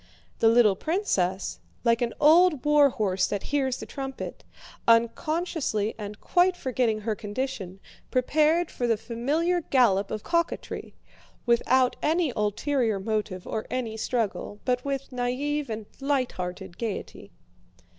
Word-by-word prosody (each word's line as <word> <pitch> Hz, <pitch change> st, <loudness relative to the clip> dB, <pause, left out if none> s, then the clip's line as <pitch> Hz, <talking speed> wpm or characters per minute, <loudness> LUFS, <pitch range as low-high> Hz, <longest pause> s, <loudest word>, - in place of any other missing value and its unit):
The 225 Hz, -, +4 dB
little 225 Hz, -3 st, +5 dB
princess, 195 Hz, -, -1 dB, 0.2 s
like 230 Hz, -1 st, +3 dB
an 235 Hz, -1 st, -1 dB
old 310 Hz, -1 st, +5 dB
war 295 Hz, -1 st, +6 dB
horse 190 Hz, -6 st, 0 dB
that 205 Hz, -, -3 dB
hears 265 Hz, -3 st, +1 dB
the -, -, -7 dB
trumpet, 270 Hz, -1 st, -6 dB, 0.4 s
unconsciously 235 Hz, -, +1 dB
and 210 Hz, -1 st, -7 dB
quite 360 Hz, +1 st, +2 dB
forgetting 245 Hz, -6 st, 0 dB
her 220 Hz, +1 st, -1 dB
condition, 205 Hz, -3 st, -4 dB, 0.3 s
prepared 310 Hz, +6 st, +2 dB
for 245 Hz, -, -2 dB
the 225 Hz, -2 st, +2 dB
familiar 285 Hz, +11 st, 0 dB
gallop 225 Hz, -, +3 dB
of 215 Hz, -1 st, -4 dB
coquetry, 335 Hz, 0 st, -2 dB, 0.5 s
without 245 Hz, +2 st, +3 dB
any 320 Hz, -3 st, +1 dB
ulterior 220 Hz, +1 st, 0 dB
motive 210 Hz, -2 st, -3 dB
or 220 Hz, -, -4 dB
any 240 Hz, -4 st, -3 dB
struggle, 220 Hz, -2 st, -2 dB
but 250 Hz, -1 st, +1 dB
with 275 Hz, -1 st, -3 dB
naïve 265 Hz, +3 st, -2 dB
and 220 Hz, -1 st, -4 dB
lighthearted 245 Hz, -12 st, -2 dB
gaiety. 225 Hz, -4 st, -5 dB
245 Hz, 125 wpm, -26 LUFS, 215-290 Hz, 0.5 s, war